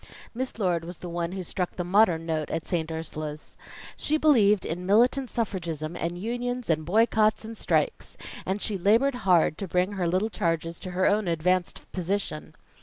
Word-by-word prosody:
Miss 255 +1 -4
Lord 180 -6 0
was 175 +1 -8
the 180 - -7
one 170 +1 -3
who 190 -1 -4
struck 180 +1 -3
the 180 - -2
modern 175 -3 +3
note 155 -2 -2
at 165 0 -3
St. 165 -3 -1
Ursula's. 155 -1 -6 0.4
She 310 - 0
believed 215 -11 +4
in 180 +3 -4
militant 245 +5 +3
suffragism 170 -8 -3
and 170 +1 -3
unions 245 +2 -2
and 155 0 0
boycotts 215 +3 +3
and 225 +1 -7
strikes; - - -1 0.3
and 190 +2 -2
she 205 -3 -2
labored 230 +9 +4 0.2
hard 165 -3 +4
to 195 - -3
bring 180 +3 +1
her 190 -4 -1
little 185 +6 0
charges 165 -1 -1
to 185 - -6
her 185 - +3
own 205 -1 +2
advanced 175 +2 0
position. 185 -3 -3
185 Hz, 180 wpm, -27 LUFS, 170-215 Hz, 0.4 s, believed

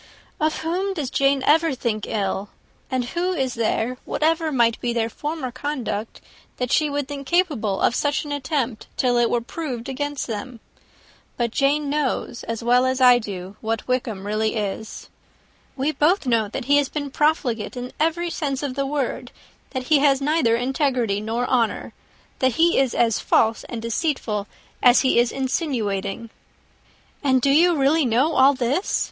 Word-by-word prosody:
"Of 310 0 0
whom 370 +4 -1
does 285 -7 -3
Jane 275 -1 +2
ever 320 -1 +3
think 225 -4 -2
ill? 200 -1 -2 0.4
And 255 -1 -1
who 360 +2 0
is 265 -7 -1
there, 230 +2 -1
whatever 320 0 0
might 235 -4 +2
be 240 -1 -1
their 230 -1 -1
former 295 -2 -4
conduct, 245 -5 -4 0.4
that 250 -1 -2
she 305 -1 +3
would 285 -1 -2
believe 280 -1 -7
capable 285 - +1
of - - +3
such 290 +3 0
an 295 - -6
attempt, 265 -5 -2
till 250 -2 +2
it 235 - +3
were 240 - +1
proved 250 -2 -5
against 290 +1 -3
them? 235 +2 -6 0.8
But 235 -2 0
Jane 285 +4 +1
knows, 280 -4 -2
as 230 0 -4
well 250 +2 +4
as 260 0 0
I 250 -1 +7
do, 195 -3 -7
what 225 0 -3
Wickham 235 -6 -2
really 215 +2 0
is. 210 0 -4 0.7
We 275 +3 0
both 315 +5 +2
know 230 -4 +2
that 240 +5 -5
he 285 +2 +4
has 285 -2 +1
been 285 -2 -4
profligate 265 -7 0
in 245 +1 -6
every 335 +2 0
sense 280 -4 -2
of 275 -3 -2
the 275 +1 -2
word; 280 -2 -3 0.4
that 260 -2 -4
he 290 +3 +3
has 275 -1 +4
neither 285 -5 +2
integrity 245 -4 0
nor 230 +3 -2
honour; 240 -3 0 0.5
that 260 -1 +2
he 335 +4 +3
is 265 -3 +1
as 230 -2 +2
false 225 0 +2
and 230 -2 -6
deceitful 230 -5 -2 0.3
as 245 0 +6
he 260 -3 +3
is 240 -1 +2
insinuating." 230 - -2 0.9
"And 260 -2 +3
do 275 +2 +2
you 340 +4 +5
really 290 +4 +3
know 255 +8 +2
all 275 +2 +5
this?" 260 - 0
260 Hz, 170 wpm, -22 LUFS, 230-290 Hz, 0.9 s, I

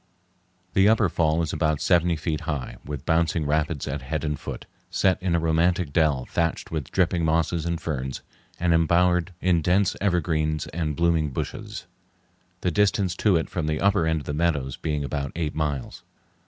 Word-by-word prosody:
The 95 +2 +5
upper 110 -4 +3
fall 80 0 +1
is 80 - -3
about 80 -3 +1
seventy 85 +1 +3
five 80 - -10
feet 80 -2 -1
high, 75 -4 -3
with 75 -1 -6
bouncing 80 -1 +1
rapids 75 0 0
at 70 +1 -3
head 80 +5 -3
and 75 -2 -2
foot, - - -7 0.2
set 95 -1 +1
in 90 -2 +1
a - - +2
romantic 80 -1 +1
dell 75 -6 +2
thatched 85 -1 -2
with 80 -5 -3
dripping 90 -2 +1
mosses 80 +1 +1
and 85 -1 -1
ferns 65 -4 -4 0.4
and 85 0 +2
embowered 90 +2 +3
in 90 -2 +3
dense 90 +4 +2
evergreens 80 -5 0
and 75 -2 -3
blooming 85 -2 +2
bushes, 65 - -5 0.8
the 90 - 0
distance 100 -1 +2
to 105 -4 +3
it 80 - +1
from 85 -4 -3
the 75 0 -1
upper 100 -5 +2
end 80 -1 +1
of - - -12
the 75 - -3
meadows 75 -5 0
being 75 -2 -2
about 70 -1 -3
eight 80 -2 -2
miles. 75 -4 -3
80 Hz, 180 wpm, -25 LUFS, 75-85 Hz, 0.8 s, The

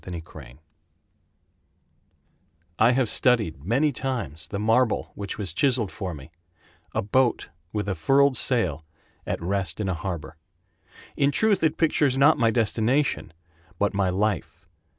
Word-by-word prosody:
George 85 -3 -7
Gray - - -13 2.2
I 115 +3 +5
have 130 -1 +1
studied 105 - +1
many 130 - +2
times 120 - -4
The 100 - -5
marble 115 +3 +1
which 100 -1 -6
was 95 -6 -4
chiseled 120 0 +1
for 90 -4 -5
me— 70 +1 -12 0.6
A - - 0
boat 120 +4 +1 0.2
with 105 -2 -3
a 100 - 0
furled 135 - +3
sail 115 -10 +1 0.4
at - - -2
rest 95 -2 -1
in 105 - -2
a 95 - 0
harbor. 85 -3 -6 0.8
In 140 - +2
truth 205 +5 +2
it 160 -1 +1
pictures 145 -5 +2
not 145 +3 +5
my 115 -2 +4
destination 115 - 0 0.5
But 100 +2 0
my 100 -2 +1
life. 95 -3 -2
110 Hz, 140 wpm, -25 LUFS, 95-130 Hz, 2.2 s, I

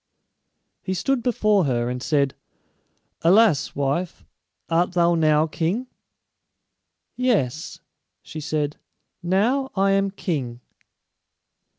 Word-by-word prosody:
He 190 - -3
stood 270 +6 0
before 215 -6 +2
her, 120 -3 0
and 125 0 -4
said, 140 -1 +1 0.9
"Alas, 185 -2 +4
wife, 145 +6 -2 0.4
art 170 +2 +1
thou 175 -1 +3
now 155 -2 +3
king?" 175 +9 -2 1.3
"Yes," 195 - -1 0.4
she 155 - -8
said; 150 -1 -2 0.4
"now 225 +10 +1
I 195 0 +2
am 195 0 +2
king." 140 -11 -4
170 Hz, 95 wpm, -23 LUFS, 150-200 Hz, 1.3 s, Alas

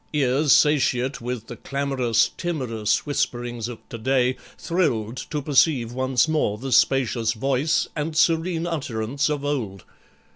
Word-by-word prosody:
Ears 140 0 +2
satiate 135 -3 +3
With 120 -2 -4
the 120 - -9
clamorous, 135 -4 0
timorous 125 - -1
whisperings 120 -5 -2
of 120 -2 -10
to 115 - -7
day, 130 +1 +1 0.2
Thrilled 125 - -1
to 150 -3 -3
perceive 135 -4 +2
once 130 +1 +1
more 150 -10 0
the 135 +4 -6
spacious 115 -3 +2
voice 135 +6 0
And 155 0 -3
serene 165 +1 +2
utterance 140 -3 -2
of 145 -1 -2
old. 110 -10 -3
130 Hz, 135 wpm, -23 LUFS, 120-150 Hz, 0.2 s, satiate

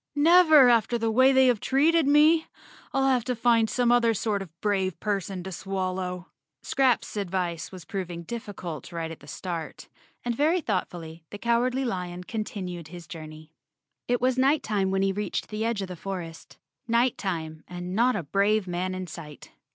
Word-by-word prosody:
"Never 315 -2 +7
after 235 0 +3
the 225 -1 0
way 260 +4 +5
they 265 0 +5
have 245 -4 +3
treated 305 +5 +3
me. 310 +3 +5 0.4
I'll 270 0 +2
have 255 -3 +2
to 250 - -1
find 230 -1 +3
some 245 -1 +2
other 235 -2 +4
sort 205 0 -1
of 165 -3 -11
brave 190 -4 0
person 195 -3 -2
to 190 - -6
swal¬ 185 +1 -3
low." 180 -1 -4 0.4
Scraps' 260 -4 +1
advice 180 -4 -2
was 185 -3 -10
proving 180 -5 -5
difficult 185 - -7
right 165 -1 -4
at 165 - -9
the 145 - -16
start, 170 0 -6 0.4
and 240 - 0
very 315 +7 +2
thoughtfully 175 - -4
the 205 - -7
Cowardly 245 +4 +1
Lion 180 -5 -4
con¬ 215 +3 -3
tinued 180 -6 -6
his 175 +1 -10
journey. 155 0 -10 0.6
It 245 0 +1
was 255 +1 +1
night 275 +4 +3
time 200 -3 0
when 190 0 +1
he 195 - +2
reached 205 +2 -3
the 215 0 -3
edge 225 -3 -1
of - - -5
the 180 - -7
forest—night 195 +7 -3
time 160 -5 -4
and 180 0 -6
not 245 +5 +3
a 185 - -2
brave 200 +5 +1
man 180 +1 -2
in 185 0 -4
sight. 155 -3 -10
200 Hz, 180 wpm, -26 LUFS, 175-245 Hz, 0.6 s, Never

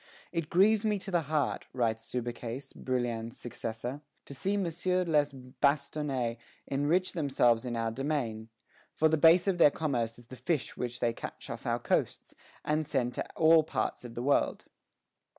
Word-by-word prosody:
"It 165 -3 -2
grieves 205 +4 +4
me 210 -1 +1
to 195 0 -7
the 175 -2 +2
heart," 155 -2 0
writes 115 -3 -1
Subercase, 120 +1 -4
Brouillan's 120 -3 -2
successor, 120 +3 -5 0.2
"to - - -9
see 195 +9 -1
Messieurs 180 0 0
les 150 -3 +3
Bastonnais 135 -1 -1 0.3
enrich 150 +7 +1
themselves 130 -7 +2
in 120 -1 -3
our 115 -1 -1
domain; 120 -4 -2 0.5
for 160 - +4
the 160 - +3
base 165 +4 +6
of 185 -3 +1
their 150 - +8
commerce 125 -7 -2
is 120 - -11
the 130 - -10
fish 155 0 -2
which 120 0 -4
they 115 -1 +2
catch - - -8
off - - -6
our - - +2
coasts, - - -1 0.3
and 155 +1 +1
send 130 -5 -1
to - - -4
all 160 0 +6
parts 155 - -2
of 120 -1 -9
the 120 - -3
world." 140 +1 +1
140 Hz, 170 wpm, -30 LUFS, 120-160 Hz, 0.5 s, their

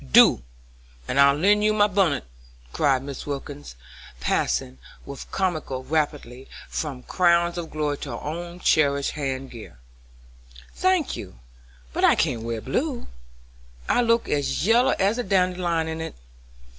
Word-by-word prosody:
"Do, 60 - +7 0.7
and 140 - 0
I'll 140 0 +6
lend 205 +7 +3
you 215 0 +3
my 205 -1 +4
bunnit," 195 -7 +1 0.5
cried 135 -2 +2
Mrs. 140 0 -7
Wilkins, 145 - -6 0.4
passing, 65 +1 -1 0.3
with 140 -2 -9
comical 155 -8 -2
rapidity, 140 -3 -2 0.2
from 135 -5 -4
crowns 170 -1 +2
of 170 -2 -5
glory 150 -2 -2
to 145 - -6
her 115 - -5
own 170 +3 -6
cherished 140 -2 +2
head 135 -2 -4
gear. 110 - -11 1.0
"Thank 370 -5 +1
you, - - -9 0.6
but - - -2
I - - +6
can't 115 - 0
wear 115 -1 -4
blue, 250 - -2 0.8
I - - +3
look 230 -1 +2
as 145 +2 -1
yellow 235 +4 +4
as 205 +5 +1
a - - 0
dandelion 180 -5 +1
in 160 0 -4
it. 160 - -6
155 Hz, 145 wpm, -24 LUFS, 135-185 Hz, 1.0 s, Do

